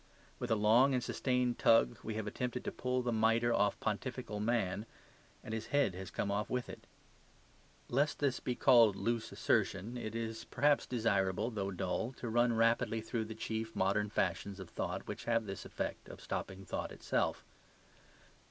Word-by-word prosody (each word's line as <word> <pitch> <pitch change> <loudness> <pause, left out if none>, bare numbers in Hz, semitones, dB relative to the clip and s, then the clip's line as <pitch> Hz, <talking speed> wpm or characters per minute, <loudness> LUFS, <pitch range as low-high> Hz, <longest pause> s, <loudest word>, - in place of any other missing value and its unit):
With 125 - -3
a 110 - +4
long 115 +6 +5
and 125 - 0
sustained 125 -2 0
tug 115 - +4
we 110 - -4
have 110 -1 -3
attempted 125 +3 -3
to - - -1
pull 125 0 -1
the 120 - 0
mitre 115 +2 +3
off 100 -1 +2
pontifical 110 0 -3
man; 105 -2 0 0.6
and 110 - -6
his 110 0 -3
head 140 -8 +2
has 95 +1 -7
come 100 - -2
off 105 0 -1
with 125 -1 -2
it. - - -10 1.0
Lest 145 +5 +1
this 140 -3 +2
should - - -12
be 125 - -1
called 115 -7 +6
loose 115 +2 -1
assertion, 105 +6 0
it 110 -2 -5
is 115 -1 -4
perhaps 145 0 +2
desirable, 110 -2 +1
though 100 -3 -2
dull, 95 +6 -2
to 120 - -6
run 120 +1 +3
rapidly 115 0 +2
through 110 0 -3
the 110 0 -7
chief 110 0 -4
modern 100 +2 +1
fashions 100 0 -1
of 95 -3 -9
thought - - -3
which - - -6
have 115 -1 +1
this 95 -2 -6
effect - - -4
of - - -10
stopping 95 0 -5
thought - - -3
itself. - - -1
115 Hz, 180 wpm, -34 LUFS, 105-120 Hz, 1.0 s, called